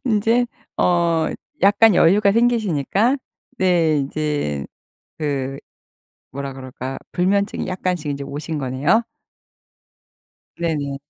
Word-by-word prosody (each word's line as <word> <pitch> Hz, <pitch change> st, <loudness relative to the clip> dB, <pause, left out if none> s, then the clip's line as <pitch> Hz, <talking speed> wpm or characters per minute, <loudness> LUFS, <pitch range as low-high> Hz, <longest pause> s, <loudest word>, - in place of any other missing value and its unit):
인제 230 Hz, +1 st, +2 dB, 0.3 s
어 170 Hz, -2 st, +2 dB, 0.3 s
약간 205 Hz, +2 st, +5 dB
여유가 200 Hz, +5 st, +5 dB
생기시니까 225 Hz, -, +2 dB, 0.4 s
네 170 Hz, -5 st, +3 dB
인제 140 Hz, -, -2 dB, 0.5 s
그 135 Hz, -3 st, -2 dB, 0.7 s
뭐라 140 Hz, +1 st, -5 dB
그럴까요? 130 Hz, 0 st, -7 dB, 0.2 s
불면증이 200 Hz, +3 st, 0 dB
약간씩 180 Hz, -4 st, -2 dB
인제 140 Hz, 0 st, -4 dB
오신 150 Hz, +3 st, -5 dB
거네요? 145 Hz, -, +1 dB, 1.5 s
네네. 150 Hz, -5 st, -2 dB
165 Hz, 210 characters per minute, -21 LUFS, 140-200 Hz, 1.5 s, 약간